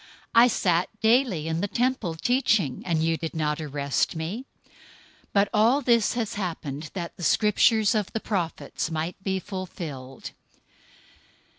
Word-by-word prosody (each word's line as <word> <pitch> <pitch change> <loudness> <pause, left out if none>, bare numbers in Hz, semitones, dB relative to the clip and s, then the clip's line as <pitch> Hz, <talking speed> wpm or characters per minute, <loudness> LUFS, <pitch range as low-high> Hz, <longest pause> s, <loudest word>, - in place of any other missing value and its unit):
I 235 +1 +7
sat 180 -6 +1
daily 220 - +2
in 165 +1 -1
the 205 - 0
temple 240 -7 -1
teaching, 215 - +1
and 160 -2 +1
you 165 0 +1
didn't 155 -2 -2
arrest 140 0 -1
me. 175 +11 -4
026:056 - - -33 0.6
But 200 0 +3
all 230 +7 +4
this 235 -3 +3
has 230 -3 -2
happened, 160 -6 -4
that 170 -3 -5
the 175 - -8
Scriptures 215 +3 +3
of 210 -2 -1
the 225 - -2
prophets 175 -6 -3
might 165 +4 -4
be 190 -1 0
fulfilled." 165 -9 -7
185 Hz, 140 wpm, -26 LUFS, 160-220 Hz, 0.6 s, I